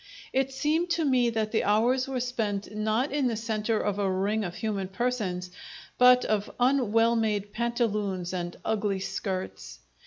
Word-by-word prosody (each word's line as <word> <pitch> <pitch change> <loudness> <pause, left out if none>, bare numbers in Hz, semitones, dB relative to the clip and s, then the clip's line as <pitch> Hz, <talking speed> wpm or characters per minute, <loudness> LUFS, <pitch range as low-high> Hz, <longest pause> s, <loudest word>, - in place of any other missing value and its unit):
It 265 0 +1
seemed 310 +6 0
to 325 - 0
me 255 -3 +3
that 220 -2 -1
the 225 - +1
hours 240 +6 +2
were 265 -1 -2
spent 215 -5 -3
not 220 +5 0
in 280 -2 +1
the 235 - -1
centre 220 0 -1
of 205 -1 -1
a 200 -1 +1
ring 205 +3 0
of 175 -2 -5
human 205 -4 -2
persons, 190 -4 -2 0.5
but 250 0 +7
of 210 -1 0
un 250 -3 +2
well 230 +1 +4
made 210 -3 -1
pantaloons 210 -6 -1
and 175 -1 -4
ugly 205 -3 0
skirts. 190 0 -4
220 Hz, 165 wpm, -27 LUFS, 200-250 Hz, 0.5 s, but